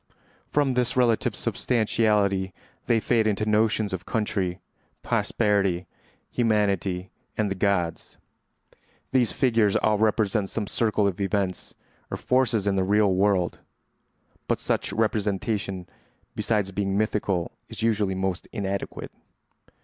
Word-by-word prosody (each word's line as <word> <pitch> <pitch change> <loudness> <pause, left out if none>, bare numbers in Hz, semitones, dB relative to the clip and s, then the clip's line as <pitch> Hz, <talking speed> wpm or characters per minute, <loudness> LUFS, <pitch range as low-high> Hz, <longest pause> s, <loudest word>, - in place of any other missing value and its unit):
From 145 -3 +2
this 125 0 0
relative 120 -3 +2
substantiality 105 -5 +1 0.3
they 115 -1 +4
fade 110 0 +2
into 110 0 0
notions 110 -1 +1
of 95 -1 -3
country, 95 -4 -1 0.4
posterity, 100 -5 +1 0.5
humanity, 100 -5 0 0.3
and 105 -2 0
the - - +2
gods. 95 -3 -1 0.9
These 125 -4 +3
figures 115 -6 +2
all 105 -1 +2
represent 105 -2 +1
some 110 - -2
circle 105 0 +1
of 100 -1 -1
events 95 -2 -2 0.3
or - - -3
forces 125 -5 +1
in 100 -1 +1
the 95 - +2
real 100 0 +3
world; 95 -2 +1 0.9
but - - +1
such - - -1
representation, 105 -3 -1 0.5
besides 105 -4 0
being 100 0 -1
mythical, 100 -4 0 0.2
is - - -6
usually 105 -4 +1
most 95 -1 -2
inadequate. 100 -3 -4
105 Hz, 120 wpm, -25 LUFS, 95-110 Hz, 0.9 s, they